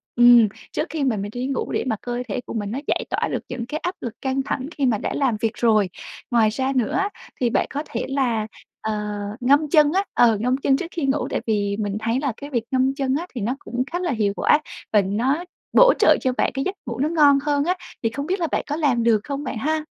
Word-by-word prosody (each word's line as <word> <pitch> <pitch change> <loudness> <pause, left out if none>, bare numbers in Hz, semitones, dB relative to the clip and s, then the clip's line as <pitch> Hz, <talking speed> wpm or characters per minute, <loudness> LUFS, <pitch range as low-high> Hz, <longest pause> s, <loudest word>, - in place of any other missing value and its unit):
ừm, 240 -2 +7 0.3
trước 305 - -2
khi 315 -3 -2
mà 245 -6 +1
mình 205 +1 -4
đi 250 +2 -3
ngủ 275 - -2
để - - 0
mà 220 - +1
cơ 245 0 -3
thể 220 - -2
của - - -7
mình 205 -2 -3
nó 260 - -2
giải - - 0
tỏa - - 0
được - - -1
những 245 -2 -4
cái 300 +5 -4
áp 355 +1 -2
lực 235 - -4
căng 265 0 -1
thẳng 265 +1 -2
khi 280 - +1
mà 220 -4 +2
đã - - -3
làm 260 -6 +1
việc 225 - +1
rồi. 215 -5 +3 0.4
Ngoài 225 -2 +4
ra 260 +4 -1
nữa 245 -4 +1
á 395 +1 +1 0.3
thì 240 - +3
bạn - - +1
có 290 +1 -3
thể 235 - -3
là, 240 -6 0 0.3
ờ, 220 0 -2 0.5
ngâm 285 +4 +3
chân 300 -2 +5
á, 390 - +2
ờ, 230 -3 +4
ngâm 250 +4 +1
chân 270 -1 +2
trước 340 - -4
khi 320 -5 -2
ngủ 275 +2 0
tại - - -1
vì 205 -2 0
mình 205 -1 -2
thấy 230 +3 0
là 275 -6 -1
cái 285 0 -8
việc 235 -5 -1
ngâm 260 +1 +2
chân 270 -2 0
á 340 +5 -3
thì 235 - -3
nó 240 +6 -1
cũng 245 +1 -3
khá 350 - -1
là 350 -4 -1
hiệu 210 -4 0
quả 295 - +4 0.3
và 210 - +6
nó 240 - 0 0.3
bổ - - +7
trợ - - +6
cho 260 - +1
bạn - - +2
cái 270 - -1
giấc 385 - -2
ngủ 235 +1 -4
nó 300 +3 +1
ngon 290 -4 +5
hơn 290 -1 +1
á. 360 +2 +1 0.3
Thì 225 - +2
không 280 +5 -5
biết 380 +3 0
là 335 - 0
bạn - - -1
có 295 - -2
làm 275 -7 +1
được 230 -2 +4
không 285 0 -4
bạn 250 - -4
ha? 310 +5 -1
260 Hz, 265 wpm, -22 LUFS, 230-290 Hz, 0.5 s, ừm